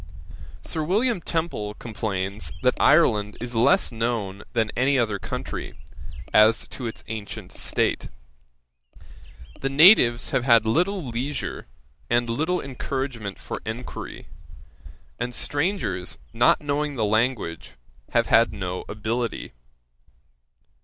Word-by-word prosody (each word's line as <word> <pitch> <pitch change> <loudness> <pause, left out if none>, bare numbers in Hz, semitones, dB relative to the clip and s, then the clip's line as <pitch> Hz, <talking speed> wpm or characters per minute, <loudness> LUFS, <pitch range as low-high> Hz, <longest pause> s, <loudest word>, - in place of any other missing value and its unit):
Sir 160 - -3
William 210 +5 +1
Temple 160 -12 -3
complains 100 -3 -3
that 125 0 +4
Ireland 105 -10 +4
is 120 +1 -6
less 115 +2 +3
known 110 -4 -2
than 110 -3 +1
any 135 +3 +3
other 110 -5 0
country, - - -5 0.6
as 110 +1 +5
to 125 - -5
its 115 - -7
ancient 110 -2 -6
state. - - -1 1.5
The 135 - -1
natives 135 - +6
have 125 - +1
had 115 -3 +5
little 180 - +1
leisure, 125 - -4 0.4
and 120 0 +2
little 155 +10 0
encouragement 130 -5 -4
for - - -6
enquiry; 115 +3 -6 0.9
and 125 0 -2
strangers, 145 - -1 0.2
not - - +4
knowing 145 0 -1
the 110 -4 0
language, 110 - -1 0.4
have - - +2
had - - +4
no 90 -1 -4
ability. 115 +3 -3
120 Hz, 110 wpm, -24 LUFS, 110-140 Hz, 1.5 s, natives